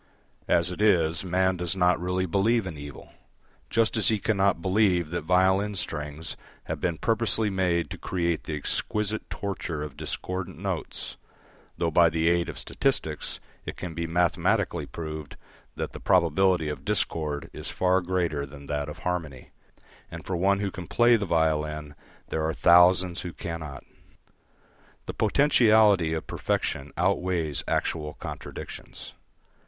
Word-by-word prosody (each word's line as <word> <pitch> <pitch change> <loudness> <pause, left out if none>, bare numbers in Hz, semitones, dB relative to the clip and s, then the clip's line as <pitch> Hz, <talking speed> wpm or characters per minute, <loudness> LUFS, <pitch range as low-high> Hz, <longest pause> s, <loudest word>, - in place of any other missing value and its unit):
As 85 +1 +3
it 90 - -5
is, 85 -6 +3
man 95 0 +1
does 90 +1 -1
not 90 -2 +3
really 90 +1 0
believe 105 +6 +2
in 90 -4 -5
evil, 75 -1 -10 0.6
just 115 -1 +2
as 110 - +3
he 110 - +4
cannot 100 -3 +1
believe 95 -3 +2
that 85 -3 -3
violin 95 +3 +3
strings 75 -2 -3 0.3
have - - -5
been 85 -2 0
purposely 110 -2 +1
made 90 -3 0
to - - -6
create 85 -3 -1
the 75 - -3
exquisite 105 +8 -2
torture 85 -6 -4
of 75 -2 -7
discordant 90 -1 -4
notes, - - -4 0.6
though 85 -1 0
by 85 +1 +6
the 80 +1 +1
aid 85 0 +1
of - - -7
statistics - - -1 0.2
it - - -7
can 90 -3 -5
be 85 0 -3
mathematically 85 +1 +1
proved 80 -3 -7 0.4
that - - -4
the - - -7
probability 90 -1 +3
of 75 - -5
discord 80 -8 -1
is - - -5
far 95 0 +2
greater 85 -5 -1
than 70 0 -10
that 75 +1 -2
of 75 - -8
harmony, 80 -8 -4 0.6
and - - -9
for 95 - -2
one 100 +3 +2
who 100 -1 -1
can 90 -2 -8
play 120 +5 +5
the 105 -3 -1
violin 75 -2 0 0.4
there 80 - -1
are 80 0 -1
thousands 90 +1 +5
who 90 -2 -6
cannot. 80 -6 -6 1.2
The - - -5
potentiality 110 - +4
of 80 - -4
perfection 70 +1 -2
outweighs 85 -5 0
actual 75 -2 -1
contradictions. - - -8
85 Hz, 150 wpm, -27 LUFS, 80-95 Hz, 1.2 s, by